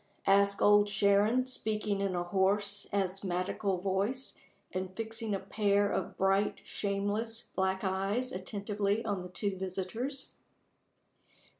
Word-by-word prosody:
asked 200 0 +4
Old 205 0 +6
Sharon, 205 +5 +3
speaking 215 -5 -1
in 195 -2 0
a 175 - 0
hoarse, 200 +2 +1
asthmatical 190 0 -1
voice, 200 +8 -1 0.4
and 185 0 -3
fixing 225 -1 -2
a - - -2
pair 200 0 +1
of 190 - -2
bright, 195 +2 +2
shameless, 205 +3 -2
black 190 0 0
eyes 195 +6 0
attentively 200 +3 -2
on 200 -4 -1
the 180 - -8
two 200 +2 -2
visitors. 190 +9 -4
200 Hz, 120 wpm, -32 LUFS, 190-210 Hz, 0.4 s, Old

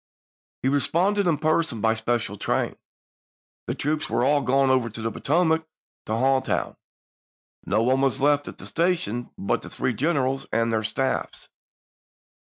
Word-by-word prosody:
He - - +2
responded 180 +8 +2
in 160 -4 +2
person 155 -4 0
by 110 +1 +3
special 110 -2 -1
train; - - -1 0.9
the - - -2
troops 155 +1 -2
were - - +1
all 145 +1 +3
gone 135 0 +3
over 130 -3 +2
the 115 0 -4
Potomac 160 +4 +1 0.4
to 110 - -1
Hall 130 +3 +3
town; - - -2 0.9
no 110 - +2
one 130 +2 +2
was 135 0 +1
left 145 +1 +2
at - - -8
the - - -11
station 165 - -1
but 115 +4 -1
the - - -9
three 130 - -1
Grant, 115 - -8
generals 135 -3 0
and 115 0 +1
their 110 0 +1
staffs. 130 +5 -2
135 Hz, 160 wpm, -25 LUFS, 115-155 Hz, 0.9 s, by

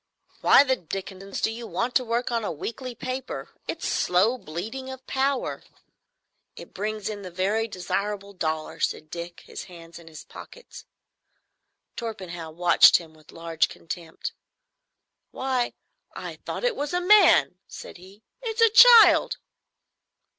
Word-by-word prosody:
"Why - - +6
the 260 -2 +1
Dickenson 195 +1 -8
do - - +2
you 230 +1 -7
want 245 +2 -2
to 255 - +3
work 240 +1 -2
on 230 -1 -1
a - - -2
weekly 235 - -6
paper? 255 +2 -6 0.2
It's - - -4
slow 210 +8 +2
bleeding 220 +12 -6
of 260 0 -9
power." 270 0 -1 0.9
"It - - -12
brings 215 +1 -4
in 210 -2 -5
the 185 - -8
very 200 +6 -1
desirable 200 +1 -4
dollars," 160 -4 -2
said 155 - -10
Dick, 170 0 -7
his - - -9
hands 170 -2 -13
in 165 - -16
his 155 -2 -11
pockets. - - -13 1.1
Torpenhow 185 -8 -6
watched 175 +2 +6
him 165 -2 -12
with 155 -1 -19
large 165 -1 -1
contempt. 165 -1 -7 1.0
"Why, 260 -2 -2 0.4
I - - -7
thought - - -4
it - - +1
was 290 +3 -4
a - - +2
man!" 360 - +5
said - - -10
he. 190 +4 -17 0.2
"It's 455 -1 -3
a 455 -1 +6
child." 445 -8 +7
210 Hz, 145 wpm, -25 LUFS, 175-260 Hz, 1.1 s, child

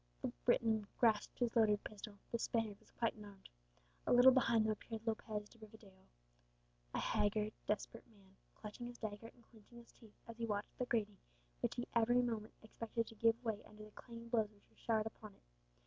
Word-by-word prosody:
The - - +1 0.2
Briton 220 -3 +3
grasped 220 -3 +3
his 240 -2 0
loaded 210 -3 +4
pistol, 210 -1 -8
the 235 - 0
Spaniard 225 -3 -1
was - - -24
quite 230 -2 0
unarmed. 205 -3 -12 0.6
A - - +3
little 245 +2 +9
behind 235 -4 +4
them 220 - +2
appeared 220 +1 -5
Lopez 215 -2 -2
de 230 - -20
Rivadeo, 205 -3 -15 0.9
a - - +1
haggard, 210 +1 +1
desperate 210 - -2
man, 195 -4 -22 0.2
clutching 215 +3 -7
his 240 0 -9
dagger 215 0 -5
and 240 0 -17
clinching 230 +1 -16
his 235 0 -13
teeth, 220 -3 -18
as 230 -1 -8
he 230 - -1
watched 205 -1 -2
the 250 - +1
grating, 210 -4 0 0.4
which - - -1
he 240 - -3
every 240 +2 +4
moment 225 -3 -3
expected 230 +1 -3
to - - -11
give 230 +2 +3
way 220 -2 -1
under 215 0 -12
the 215 - -14
clanging 230 +1 -10
blows 220 -3 +2
which 205 -1 -26
were - - -27
showered 220 -2 +1
upon 215 -2 -8
it. - - -28
220 Hz, 195 wpm, -39 LUFS, 210-230 Hz, 0.9 s, little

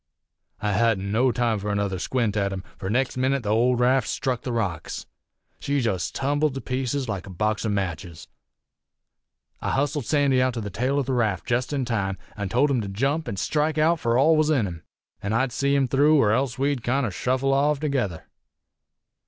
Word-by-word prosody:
"I 105 - 0
hadn't 100 -2 +1
no 125 +4 +3
time 120 -3 0
fur 105 +1 -4
another 100 -2 -1
squint 115 -1 -1
at 100 -2 0
him, 95 -1 -5 0.2
fur 95 - -4
next 125 +4 0
minit 130 0 +1
the 105 - -3
old 120 +3 +3
raft 130 +2 +3
struck 130 -4 -2
the 125 - -4
rocks. 100 -9 -3 0.5
She 140 0 0
jest 100 -8 -1
tumbled 145 +1 0
to 135 - -4
pieces 130 +1 -2
like 100 -3 -4
a - - -8
box 105 +4 -1
o' - - 0
matches. 90 -4 -4 1.3
I - - -2
hustled 140 -2 -1
Sandy 140 -4 +3
out 130 -1 +1
to 115 - -3
the 100 -1 -5
tail 130 +8 0
o' 140 - +2
the 130 - -2
raft 110 -7 0
jest 125 +3 0
in 140 -3 -1
time, 100 -5 -1 0.2
an' 100 -2 -4
told 135 +7 +2
him 125 -4 +1
to 100 - -5
jump 135 +11 -1
an' 100 - -4
strike 150 +9 0
out 160 +2 +3
fur 115 -2 +1
all 155 +5 +5
was 155 0 +2
in 135 -9 +2
him, 85 -4 -6 0.4
an' 100 +2 -2
I'd 125 +3 +1
see 140 +3 +1
him 135 -2 +2
through 145 +4 +4
er 105 - +3
else 130 +2 0
we'd 140 -1 0
kinder 125 -2 0
shuffle 130 +6 0
off 145 +1 +2
together. 125 - -2
125 Hz, 205 wpm, -24 LUFS, 105-140 Hz, 1.3 s, all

